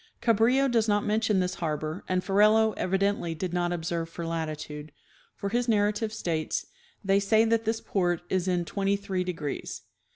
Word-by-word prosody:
Cabrillo 240 +4 +3
does 230 -3 +2
not 205 -1 +2
mention 215 -1 +2
this 180 0 0
harbor, 155 +1 -3
and 185 0 +1
Ferrelo 215 +2 +4
evidently 195 -2 0
did 175 +2 -4
not 175 -1 0
observe 170 -1 -2
for 170 0 -6
latitude, 155 -2 -4 0.4
for 200 - -3
his 240 +3 0
narrative 210 0 +1
states, 165 -7 -2 0.2
" 475 - -34
they 195 +1 +4
say 220 +3 +3
that 225 0 +1
this 225 +1 0
port 175 -3 0
is 185 0 0
in 175 -2 +1
twenty 200 +2 0
three 195 -2 -2
degrees." 165 -6 -5
195 Hz, 170 wpm, -27 LUFS, 170-215 Hz, 0.4 s, Ferrelo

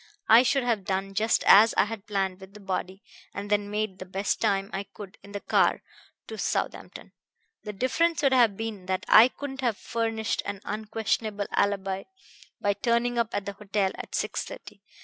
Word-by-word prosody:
I 225 +2 +8
should 260 +2 +1
have 230 -5 0
done 195 +1 -2
just 220 +3 +1
as 215 +2 +7
I - - +5
had 210 -1 -7
planned 195 -2 -2
with 190 +1 -13
the - - -10
body, 190 0 -4 0.3
and 205 +1 -6
then 205 -1 +1
made 210 -2 -3
the 185 - -7
best 195 +2 -2
time 195 +1 0
I 195 - -2
could 200 -2 -10
in 200 - -14
the 205 - -4
car - - +2 0.4
to - - -8
Southampton. - - -3 0.5
The 210 - -5
difference 300 - 0
would 275 -1 +4
have 235 -6 +4
been 215 -5 -5
that 185 0 -2
I 230 - +8
couldn't 270 0 -7
have 235 -5 0
furnished 225 -1 -2
an 200 -1 -5
unquestionable 215 -1 -2
alibi 195 -1 0 0.5
by 205 - +1
turning 235 +2 0
up 230 -1 +1
at 205 -1 -2
the 200 - -4
hotel 200 -1 -1
at - - -7
six - - -2
thirty. - - -11
210 Hz, 190 wpm, -27 LUFS, 195-230 Hz, 0.5 s, I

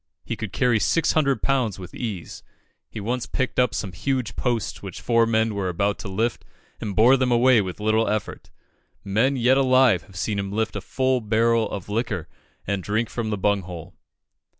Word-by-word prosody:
He 115 - -3
could 110 -3 -6
carry 120 +2 +2
six 165 +9 +2
hundred 140 -4 +1
pounds 130 -7 +1
with 90 -2 -10
ease; 105 -8 -5 0.5
he - - -7
once 120 +4 -2
picked 130 -1 -2
up 125 -3 +2
some 95 - -3
huge 110 +5 -2
posts 120 -4 -2
which 95 -3 -7
four 115 -1 +2
men 110 -1 +1
were 100 -2 -2
about 100 +3 -1
to 115 - -7
lift, 110 +5 -1 0.4
and 100 -2 -4
bore 125 +5 +6
them 130 -1 +1
away 120 -1 +5
with 95 -1 -6
little 110 +1 +2
effort. 105 -1 -3 0.5
Men 115 +8 +1
yet 130 +1 +3
alive 130 -7 +4
have 95 - -18
seen 100 +3 -2
him 100 0 -3
lift 110 +2 -1
a - - -3
full 130 -1 0
barrel 115 +1 +2
of 95 - -6
liquor 105 -6 -2 0.4
and 100 0 -1
drink 110 +5 -1
from 115 -2 -3
the 105 - -1
bung 100 +1 +1
hole. 85 -3 -9
110 Hz, 195 wpm, -24 LUFS, 100-125 Hz, 0.5 s, bore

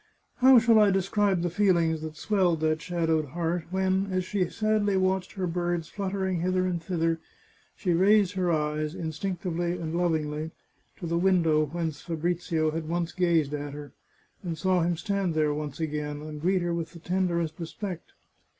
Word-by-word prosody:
How 260 0 +7
shall 225 -1 +6
I 210 -1 +6
describe 195 -1 +1
the 175 - +1
feelings 170 -4 +2
that 155 -1 -6
swelled 180 -3 +1
that 155 0 +1
shadowed 165 -3 0
heart 170 0 -1
when, 190 +1 0
as 185 -1 0
she 185 -3 -1
sadly 215 -2 +1
watched 185 0 0
her 190 -2 -2
birds 175 -1 -2
fluttering 190 -2 -2
hither 185 +1 +1
and 175 -2 -1
thither, 165 -1 0 0.6
she 180 -3 0
raised 200 +2 +4
her 185 -2 0
eyes, 150 0 -1
instinctively, 175 0 -2
and 165 -2 -4
lovingly, 155 -3 -1 0.5
to - - -7
the 170 0 0
window 165 -5 +3
whence 160 -1 -3
Fabrizio 165 -1 -1
had 160 0 -4
once 170 0 -1
gazed 170 -5 +1
at 145 -1 -4
her, 145 0 -8 0.5
and 170 -4 -4
saw 185 +2 +2
him 170 0 0
stand 195 -2 -1
there 155 -1 +2
once 150 -1 -5
again, 150 -2 -3
and 150 -1 -7
greet 185 +2 +2
her 175 0 -1
with 165 0 -4
the 170 - -10
tenderest 170 -2 -1
respect. 175 +1 -6
175 Hz, 170 wpm, -27 LUFS, 160-185 Hz, 0.6 s, How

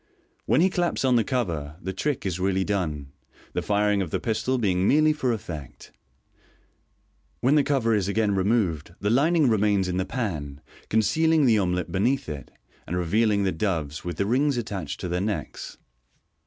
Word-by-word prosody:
When - - +4
he 185 +1 +3
claps 175 -6 0
on 130 -1 +4
the 115 - +4
cover, 85 - -2
the 95 0 -5
trick 130 +4 -2
is 95 -2 -2
really 95 0 +1
done, 80 -9 -2 0.4
the - - -1
firing 105 -1 +1
of 90 - -3
the - - -1
pistol 125 +3 -1
being 95 -4 +1
merely 155 +1 +4
for 135 -5 -1
effect. 80 - -7 1.5
When 130 +4 +3
the 150 - +5
cover 130 -6 +1
is 100 -3 +1
again 105 0 +1
removed, 95 -6 0
the 105 +1 0
lining 155 +4 +3
remains 105 -4 +2
in 90 0 -2
the 95 - 0
pan, 80 - -4 0.3
concealing 150 +9 +3
the 115 -4 +4
omelet 90 -3 -1
beneath 125 +9 0
it, 75 -2 -7 0.4
and 90 - -2
revealing 100 +4 +2
the 95 - +1
doves, 80 -5 -2
with 85 -2 -5
the 100 - 0
rings 135 +5 +1
attached 95 -10 -4
to 90 - -3
their 90 +1 -1
necks. 105 +1 -4
100 Hz, 175 wpm, -25 LUFS, 90-125 Hz, 1.5 s, the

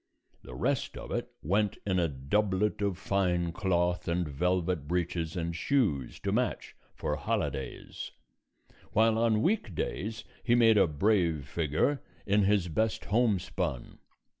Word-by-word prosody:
The - - -10
rest - - -1
of - - -8
it - - -2
went 100 +5 +1
in 95 -2 +1
a 85 - +2
doublet 95 +10 0
of 100 -3 0
fine 90 -3 0
cloth 90 -1 0
and 85 0 0
velvet 90 +1 0
breeches 85 0 -1
and 85 0 -2
shoes 85 - 0
to - - -1
match - - -1 0.2
for - - -2
holidays, 65 - -3 0.8
while 110 +1 +4
on 115 -1 +3
week 175 - 0
days 110 +8 -3 0.2
he 120 - +3
made 115 -3 +6
a 95 - +5
brave 85 -2 +1
figure 80 - 0 0.2
in 100 0 +3
his 100 -3 +3
best 110 +7 -1
homespun. 100 - 0
95 Hz, 140 wpm, -30 LUFS, 85-105 Hz, 0.8 s, made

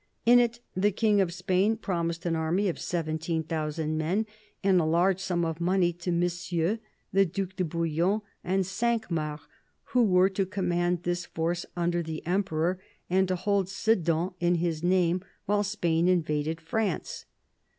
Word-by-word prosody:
In 245 +1 +7
it 235 0 +1
the 200 +3 +3
King 210 0 +3
of 180 -3 0
Spain 190 +4 +1
promised 170 -4 -2
an 170 -1 +1
army 165 +5 +1
of 175 - -2
17,000 160 -1 -2
men 185 +8 0 0.4
and 190 -2 +4
a - - 0
large 175 +4 +2
sum 175 -3 0
of 165 +1 -3
money 175 0 +2
to 175 +1 -4
Monsieur, 175 +3 0 0.3
the 195 +1 +5
Due 195 +2 -2
de 185 - 0
Bouillon, 170 +5 0 0.2
and 190 +1 +1
Cinq 220 +2 -1
Mars, 150 -2 -2 0.5
who 250 -1 +3
were 185 -3 +5
to 190 -1 -1
command 175 -2 0
this 175 0 -2
force 170 +2 -2
under 175 0 +1
the 160 -1 -6
Emperor 180 -1 0 0.3
and 190 +1 +3
to 185 - 0
hold 195 0 0
Sedan 180 -5 +1
in 175 0 +2
his 165 -2 -1
name 180 0 +2 0.2
while 205 +1 +2
Spain 175 -5 +1
invaded 160 -3 +1
France. 195 +3 -2
175 Hz, 160 wpm, -28 LUFS, 165-195 Hz, 0.5 s, In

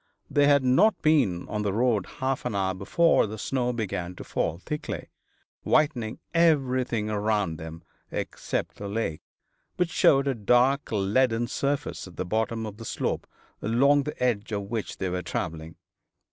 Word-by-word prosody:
They 145 -1 +4
had 140 -2 +5
not 175 +13 +4
been 130 - +2
on 105 - -2
the 105 -1 0
road 115 -4 +1
half 130 0 -1
an 125 -4 -2
hour 95 -1 +1
before 110 - +3
the 110 +1 -6
snow 125 +2 -1
began 95 -6 -3
to - - -8
fall 80 - -1
thickly, 150 +11 -5 0.5
whitening 130 -8 +1 0.2
everything 130 -9 +2
around 105 -5 0
them, 80 +1 -8 0.3
except - - -3
the 100 - -6
lake, 100 -7 -2 0.6
which 180 -2 +1
showed 140 0 +4
a 135 - +2
dark 125 +5 +2
leaden 115 +3 +2
surface 140 -3 -2
at 90 - -13
the - - -3
bottom 110 +3 -1
of 105 -1 -7
the 115 - -9
slope - - -2 0.3
along 140 +7 +4
the 150 -2 -5
edge 115 -4 0
of 100 -1 -2
which 115 -3 -3
they 95 - -2
were 90 0 -2
travelling. 80 -2 -4
115 Hz, 160 wpm, -26 LUFS, 100-135 Hz, 0.6 s, had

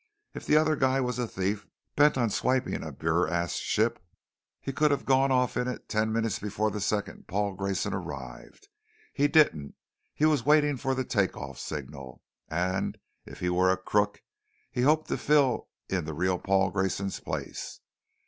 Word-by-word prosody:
"If - - -8
the 150 - +5
other 155 0 +3
guy 130 -1 +2
was 125 -2 -1
a 120 - 0
thief 100 +1 -2 0.3
bent 145 -1 +5
on 120 -4 +1
swiping 130 +4 0
a 80 - -6
BurAst 85 +3 0
ship, 115 -2 0 0.6
he 135 - -5
could 150 +3 +3
have 140 -2 0
gone 135 0 +3
off 125 -1 +2
in 125 0 0
it 125 - -5
ten 110 0 0
minutes 115 -2 0
before 105 +1 -1
the 105 - -4
second 105 +1 -2
Paul 100 +1 -1
Grayson 100 0 -2
arrived. 405 - -7 0.5
He 145 - +3
didn't. 145 - +3 0.4
He 150 - +2
was 150 -6 +3
waiting 150 0 +4
for 130 +2 -1
the 130 - -1
take 100 -6 0
off - - -7
signal; 70 -4 -7 0.2
and 95 +4 -1 0.3
if - - -11
he 90 - +1
were 90 +1 +3
a 95 - +3
crook, 105 +2 0 0.5
he 125 - -1
hoped 155 +4 +3
to - - 0
fill 145 -4 +2 0.2
in 90 -4 -1
the 80 0 -5
real 90 +2 0
Paul 95 0 +2
Grayson's 95 0 -1
place. - - -5
105 Hz, 175 wpm, -28 LUFS, 95-130 Hz, 0.6 s, the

